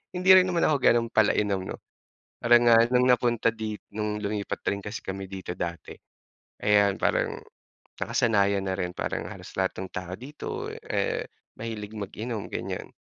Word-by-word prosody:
hindi 185 +1 0
rin 185 - +8
naman 170 -2 +2
ako 155 - +3
gano'n 115 0 +4
pala 110 -1 +5
inom 100 -3 0
'no, - - -6 0.6
parang 120 0 +5
nga 115 - +8 0.2
nung 125 +1 +4
napunta 120 -2 +3
dit 110 -1 -5 0.2
nung 105 -1 -2
lumipat 100 0 -3
rin 100 0 -3
kasi 105 +1 -5
kami 95 0 -5
dito 95 -2 -5
dati, 85 -1 -5 0.7
ayan 100 -1 +4
parang - - +1 0.6
nakasanayan 100 -3 +2
na 95 - 0
rin, 90 -1 -2
parang - - -2
halos - - -10
lahat 95 0 +1
ng 95 - -6
tao 90 0 -5
dito 145 +5 -8 0.4
eh, - - -1 0.3
mahilig 110 -2 -6
mag-inom, 105 +2 -5
ganiyan. - - -5
105 Hz, 160 wpm, -27 LUFS, 100-120 Hz, 0.7 s, rin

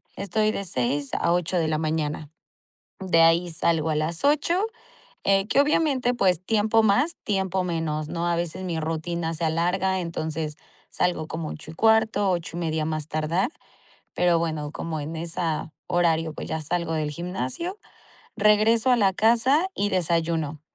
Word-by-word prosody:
Estoy 215 +2 0
de 200 - -3
6 140 -4 -1
a 170 - +1
8 180 +1 0
de 165 -2 +1
la 155 -1 0
mañana. 155 -1 -2 0.7
De 175 -3 +3
ahí 165 +2 +4
salgo 160 -1 +1
a 150 - 0
las 160 +2 -2
8 305 +7 +2 0.6
eh, 195 0 +3
que, 275 - +4
obviamente, 280 -4 +2
pues, 185 -7 +2
tiempo 220 +2 +3
más, 285 +12 +2
tiempo 190 -2 0
menos, 160 -3 -2
¿no?, 170 +1 -2
a 170 - +1
veces 175 +2 -3
mi 170 -3 -2
rutina 165 +1 -2
se 165 - -3
alarga. 180 +4 +1
Entonces 160 -2 -4 0.3
salgo 175 -3 0
como 160 0 -5
8 155 - -8
y - - -12
cuarto, 220 0 +3
8 170 -2 -3
y - - -3
media, 160 -2 -1
más 155 -1 -3
tardar. 155 - 0 0.6
Pero 175 -1 +3
bueno, 155 -3 -2
como 160 -2 -4
en 155 +3 -5
esa, 165 -1 -3 0.2
horario, 165 -3 +1
pues - - -7
ya 160 - -2
salgo 170 +1 -2
del 155 -1 -1
gimnasio, 180 - -4 0.6
regreso 220 +3 +4
a 245 - +5
la 195 -4 +3
casa 240 - +3
y 205 - 0
desayuno. 165 -4 0
170 Hz, 165 wpm, -25 LUFS, 160-200 Hz, 0.7 s, a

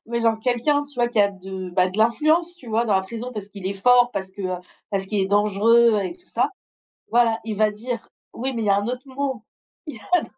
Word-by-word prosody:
mais 235 +1 -2
genre 225 -1 +2
quelqu'un, 250 +5 +1
tu 285 - -18
vois? 240 -1 +1
Qui 235 -3 +2
a 200 0 +4
de, 190 -1 -7
bah, 180 +1 +2
de 185 +3 -7
l'influence, 310 +10 +2
tu 255 -9 -13
vois? 225 +2 +1
Dans 215 -4 +1
la 190 - +3
prison 230 +6 -6
parce 210 -3 -6
qu'il 200 -2 -8
est 195 - -1
fort, 245 +4 +4
parce 190 -1 -4
que, 195 +1 -8
heu, 185 -1 -2 0.3
parce 195 -2 -1
qu'il 205 +1 -1
est - - 0
dangereux 210 +3 +4
et 195 - -5
tout 360 - -29
ça. - - 0 0.6
Voilà, 230 -1 +3
il 220 -2 -4
va 215 +1 +3
dire 235 +3 -6 0.2
oui, 260 +3 -3
mais 230 - -2
il 215 - -2
y - - +3
a 200 - +5
un 205 +1 -1
autre 250 +2 -4
mot. 265 -3 -3 0.4
Il 300 - -7
y - - -10
a 350 +13 +1
un - - -7
225 Hz, 265 wpm, -23 LUFS, 200-245 Hz, 0.6 s, a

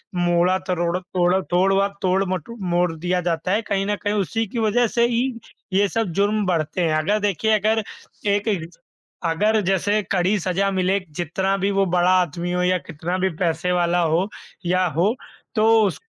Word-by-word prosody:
मोड़ा, 175 +1 +2
तरोड़ 175 -2 -1
तोड़ 180 +1 +1
तोड़ 185 +2 +3
व 195 +1 +3
तोड़ 190 +1 +2
मटो 185 +6 -5
मोड़ 175 0 +2
दिया 180 +2 -1
जाता 170 +1 -1
है, 210 +3 +2
कहीं 195 -3 -1
न 205 0 0
कहीं 205 0 0
उसी 215 +3 -1
की 235 - -4
वजह 225 +2 +2
से 235 +2 +2
ही 240 0 +1 0.5
ये 200 +2 +3
सब 225 -1 -1
जुर्म 205 0 +2
बढ़ते 170 0 -1
हैं, 160 -2 +1
अगर 200 +7 +1
देखिए 205 +1 0
अगर 220 +2 +1 0.5
एक 205 +2 -3
एग्ज 175 -5 -2 0.5
अगर 210 +7 +2
जैसे 205 +3 +1
कड़ी 190 +2 +2
सज़ा 190 +2 0
मिले 190 +1 +1 0.2
जितना 190 +4 -1
भी 195 +1 0
वो 195 0 +2
बड़ा 180 0 +3
आदमी 175 +1 -3
हो 180 0 0
या 185 0 +2
कितना 170 +3 -3
भी 190 +1 +1
पैसे 175 +1 -1
वाला 175 0 +2
हो 170 +3 +1 0.4
या 185 +1 +2
हो 200 +7 +3 0.4
तो 215 -1 +3 0.2
उस 195 - -2
185 Hz, 185 wpm, -22 LUFS, 175-205 Hz, 0.5 s, तोड़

